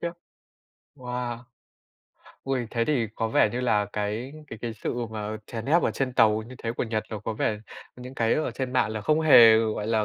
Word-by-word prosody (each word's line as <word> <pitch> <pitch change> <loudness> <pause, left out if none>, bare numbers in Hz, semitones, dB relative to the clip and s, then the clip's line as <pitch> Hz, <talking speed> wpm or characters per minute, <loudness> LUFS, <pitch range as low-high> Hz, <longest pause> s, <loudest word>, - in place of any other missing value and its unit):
Khiếp. 170 - -2 0.9
Wow! 125 -2 -4 1.1
Ôi. 130 -3 -2
Thế 115 -1 0
thì 125 -6 +1
có 115 -1 -1
vẻ 110 - +3
như 125 - -2
là 105 -4 +1
cái 105 +6 -3
cái 110 - -9
cái 120 -1 -3
sự 110 - -4 0.2
mà 110 0 -4
chèn 115 -1 -6
ép 165 +5 +3
ở - - +2
trên 135 -2 -2
tàu 110 -2 +3
như 125 +3 -11
thế 115 - -3
của - - -1
Nhật 110 -2 -2
nó 110 - -4
có 110 +1 -4
vẻ 105 0 -1 0.4
những 125 +1 -9
cái 115 -3 +1
ở 155 - -1
trên 130 -2 -4
mạng 120 -4 +2
là 110 - -4
không 155 +9 +2
hề, 115 -8 +8
gọi 110 -2 -1
là, 110 -1 +1
115 Hz, 215 wpm, -26 LUFS, 110-125 Hz, 1.1 s, hề